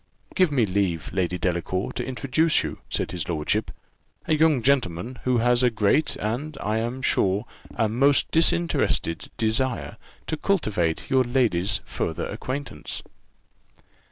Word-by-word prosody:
"Give 185 Hz, -5 st, +3 dB
me 130 Hz, -6 st, +3 dB
leave, 90 Hz, -5 st, -1 dB
Lady 90 Hz, -1 st, 0 dB
Delacour, 90 Hz, +1 st, -1 dB
to -, -, -3 dB
introduce 135 Hz, +5 st, +1 dB
to -, -, -2 dB
you," -, -, -10 dB
said -, -, -2 dB
his 90 Hz, -2 st, -4 dB
lordship, 85 Hz, +6 st, 0 dB, 0.6 s
"a -, -, +1 dB
young 155 Hz, -5 st, +3 dB
gentleman, 120 Hz, -3 st, 0 dB
who 125 Hz, -1 st, +3 dB
has 120 Hz, +1 st, +3 dB
a 125 Hz, -, +4 dB
great, 110 Hz, +7 st, +2 dB
and, 135 Hz, +8 st, -3 dB
I 110 Hz, +2 st, -1 dB
am 120 Hz, +3 st, -3 dB
sure, 100 Hz, -3 st, +2 dB, 0.3 s
a 110 Hz, -, +2 dB
most 135 Hz, +6 st, +3 dB
disinterested 165 Hz, -, +1 dB
desire 115 Hz, +3 st, -1 dB, 0.3 s
to 160 Hz, -, -3 dB
cultivate 105 Hz, -, 0 dB
your 130 Hz, -1 st, +5 dB
ladyship's 115 Hz, -7 st, +1 dB
further -, -, -3 dB
acquaintance." 130 Hz, -, -5 dB
120 Hz, 140 wpm, -25 LUFS, 95-135 Hz, 0.6 s, your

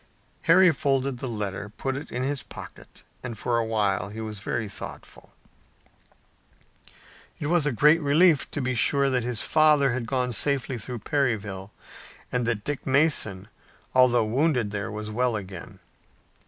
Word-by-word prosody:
Harry 185 Hz, +1 st, +7 dB
folded 135 Hz, -3 st, -1 dB
the 130 Hz, -, -4 dB
letter, 105 Hz, -3 st, -4 dB
put 135 Hz, +5 st, -4 dB
it 140 Hz, -, -7 dB
in 125 Hz, -, -2 dB
his 140 Hz, 0 st, -2 dB
pocket, -, -, -12 dB, 0.2 s
and 120 Hz, -3 st, -6 dB
for 120 Hz, +2 st, 0 dB
a -, -, +1 dB
while 100 Hz, -3 st, 0 dB
he 110 Hz, +2 st, -8 dB
was 110 Hz, -2 st, -5 dB
very 110 Hz, +3 st, -3 dB
thoughtful. 100 Hz, -, -10 dB, 2.1 s
It -, -, -4 dB
was 160 Hz, -1 st, +2 dB
a -, -, +1 dB
great 150 Hz, +7 st, +4 dB
relief 155 Hz, +2 st, +4 dB
to 145 Hz, -, -4 dB
be 130 Hz, 0 st, 0 dB
sure 140 Hz, +3 st, +2 dB
that 125 Hz, -1 st, +1 dB
his 120 Hz, -2 st, -1 dB
father 150 Hz, -3 st, +4 dB
had 120 Hz, -2 st, -3 dB
gone 125 Hz, 0 st, -1 dB
safely 135 Hz, -1 st, 0 dB
through 120 Hz, +1 st, -7 dB
Perryville, 105 Hz, -8 st, -1 dB, 0.6 s
and 125 Hz, -2 st, 0 dB
that 110 Hz, -3 st, -1 dB
Dick 145 Hz, +2 st, -4 dB
Mason, 130 Hz, -9 st, +2 dB, 0.5 s
although 125 Hz, -3 st, +4 dB
wounded 125 Hz, -2 st, +1 dB
there, 100 Hz, -1 st, -4 dB
was 105 Hz, 0 st, -6 dB
well 120 Hz, +1 st, 0 dB
again. 95 Hz, -4 st, -8 dB
125 Hz, 155 wpm, -26 LUFS, 110-140 Hz, 2.1 s, Harry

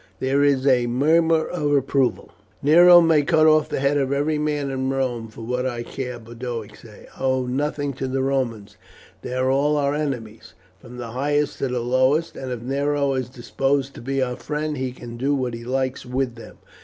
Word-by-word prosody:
There 135 Hz, +2 st, +1 dB
was 140 Hz, -2 st, +2 dB
a 125 Hz, -3 st, +3 dB
murmur 160 Hz, +6 st, +3 dB
of 150 Hz, -5 st, -2 dB
approval. 135 Hz, -2 st, 0 dB, 0.3 s
"Nero 175 Hz, +4 st, +8 dB
may 165 Hz, -3 st, +4 dB
cut 155 Hz, +2 st, +3 dB
off 155 Hz, -1 st, +4 dB
the -, -, -2 dB
head 140 Hz, +1 st, +2 dB
of 135 Hz, -1 st, -1 dB
every 150 Hz, +2 st, 0 dB
man 150 Hz, -2 st, -1 dB
in 130 Hz, 0 st, -2 dB
Rome 125 Hz, -4 st, -2 dB
for 110 Hz, +1 st, -12 dB
what 125 Hz, +3 st, -2 dB
I 120 Hz, -2 st, -4 dB
care," 125 Hz, 0 st, -6 dB
Boduoc 115 Hz, -2 st, -7 dB
said. 110 Hz, -3 st, -15 dB
"I -, -, -6 dB
owe 130 Hz, -1 st, +1 dB
nothing 145 Hz, +2 st, -2 dB
to 130 Hz, +1 st, -4 dB
the 130 Hz, 0 st, -1 dB
Romans. 125 Hz, -7 st, -2 dB, 0.4 s
They 125 Hz, -, -5 dB
are 130 Hz, +1 st, +1 dB
all 145 Hz, +2 st, +2 dB
our 140 Hz, -1 st, +1 dB
enemies, 125 Hz, -8 st, -5 dB, 0.2 s
from 125 Hz, +1 st, -12 dB
the 120 Hz, -2 st, -6 dB
highest 145 Hz, +4 st, -1 dB
to 135 Hz, -, 0 dB
the 125 Hz, -1 st, -2 dB
lowest; 130 Hz, +7 st, +1 dB
and 130 Hz, -1 st, -6 dB
if 120 Hz, -2 st, -5 dB
Nero 140 Hz, +1 st, 0 dB
is 130 Hz, -2 st, -2 dB
disposed 135 Hz, +2 st, -1 dB
to -, -, -10 dB
be 135 Hz, +2 st, -1 dB
our 125 Hz, -1 st, -3 dB
friend 150 Hz, 0 st, -3 dB
he 130 Hz, -2 st, -3 dB
can 120 Hz, -1 st, -10 dB
do 140 Hz, +4 st, 0 dB
what 130 Hz, -3 st, -2 dB
he 115 Hz, 0 st, -7 dB
likes 130 Hz, +1 st, -2 dB
with 125 Hz, 0 st, -2 dB
them. 115 Hz, -, -13 dB
135 Hz, 205 wpm, -22 LUFS, 125-145 Hz, 0.4 s, Nero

